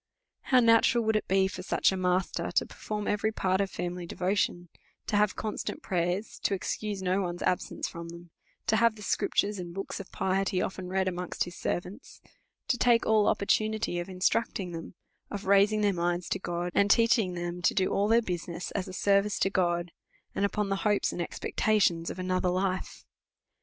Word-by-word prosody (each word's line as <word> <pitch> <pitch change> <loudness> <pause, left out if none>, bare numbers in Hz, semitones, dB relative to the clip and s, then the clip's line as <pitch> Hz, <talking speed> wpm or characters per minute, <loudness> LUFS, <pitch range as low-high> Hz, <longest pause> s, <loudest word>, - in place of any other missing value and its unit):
How 255 -2 +5
natural 230 0 +4
would 220 0 +1
it 215 - 0
be 190 0 +3
for 185 -1 -6
such 185 - +2
a - - -2
master 185 0 0
to - - +2
perform 210 -1 -5
every 210 +1 +1
part 190 -2 0
of 195 - -1
family 175 -1 -4
devotion; 180 -1 -1 0.4
to - - -1
have 210 -1 +3
constant 215 -1 -4
prayers; 180 +3 -2
to 200 - 0
excuse 200 +1 -3
no 185 +2 +1
one's 175 -1 -3
absence 180 - -1
from 170 0 -8
them; 170 0 -11 0.3
to 220 - +2
have 230 0 +4
the 210 - -11
Scriptures, 205 +1 0
and 175 -1 -7
books 195 - -5
of 195 - -9
piety, 190 0 0
often 185 0 -3
read 190 +1 0
amongst 180 -1 -2
his 175 +1 -8
servants; 185 +8 -5 0.5
to 245 - 0
take 240 -2 +4
all 215 -1 +4
opportunities 215 -3 +1
of 175 - -8
instructing 185 0 0
them, 165 0 -8 0.3
of 200 -1 -6
raising" 200 +2 +4
their 205 -1 +3
minds 175 0 -1
to - - -1
God, 175 0 -3
and 200 0 +3
teaching 220 -3 +4
them 175 0 -4
to - - +2
do 190 -2 +1
all 200 +1 +2
their 230 +2 +4
business, 175 -2 -4
as 185 - -3
a 185 - -8
service 200 +1 +2
to 195 - +1
God, 175 -2 0 0.4
and - - -1
upon 205 0 -1
the 195 - 0
hopes 210 0 +1
and 175 - -4
expectations 175 -2 +1
of - - -6
another 185 0 0
life 185 +1 -2
190 Hz, 190 wpm, -29 LUFS, 180-210 Hz, 0.5 s, How